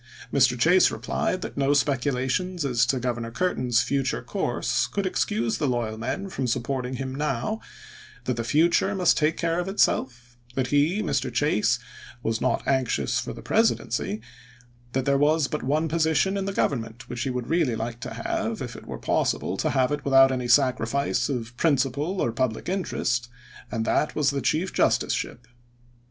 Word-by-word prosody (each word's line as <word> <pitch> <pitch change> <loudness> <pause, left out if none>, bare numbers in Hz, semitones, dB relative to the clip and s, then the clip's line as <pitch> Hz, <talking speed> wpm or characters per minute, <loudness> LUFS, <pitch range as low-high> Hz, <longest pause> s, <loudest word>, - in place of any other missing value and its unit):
Mr. 125 -3 +3
Chase 175 +8 +5
replied 185 0 -2
that - - -7
no 140 +1 +2
spec 135 -2 +2
ulations 145 +7 -1
as 125 -2 +2
to 130 0 +1
Governor 120 -2 -2
Curtin's 125 -5 +1
future 130 - -1
course - - -1
could - - -2
excuse 115 +2 0
the 145 - +1
loyal 120 -3 -1
men 120 - -3
from 135 -9 -3
supporting 130 +1 -2
him 130 0 -4
now; 150 - -2 0.6
that 125 0 -1
the 115 - -2
future 170 - +2
must 180 -3 +4
take 155 +1 +1
care 170 0 0
of 180 - -2
itself; 125 - 0 0.2
that 130 - +1
he, 155 +9 +2
Mr. 135 -7 -1
Chase, 120 -3 +2 0.5
was 115 0 -1
not - - 0
anxious 125 - +1
for - - -4
the - - -9
Presidency; 105 +2 0 0.7
that 130 0 0
there 140 -1 +3
was 150 0 +3
but 150 - -3
one 150 +5 0
position 160 +4 +1
in 195 -1 -2
the 195 - -2
Government 120 -9 -2
which 120 - -5
he 135 - -1
would 125 -1 -3
really 160 -7 +1
like 115 +1 -4
to - - -6
have, - - -2
if - - -6
it - - -11
were - - -5
pos - - +1
sible - - -4
to - - +1
have 130 +1 +2
it 145 -1 -2
without 135 -1 +6
any 125 -2 -2
sacrifice 130 +2 +2
of 120 -3 -4
principle 145 +5 +1
or 115 - +1
public 115 -1 -2
interest, 120 - -1 0.4
and 115 -2 -2
that 150 - +1
was 145 -2 +2
the 140 -1 -2
chief 170 +8 0
justiceship. - - 0
135 Hz, 180 wpm, -25 LUFS, 120-155 Hz, 0.7 s, without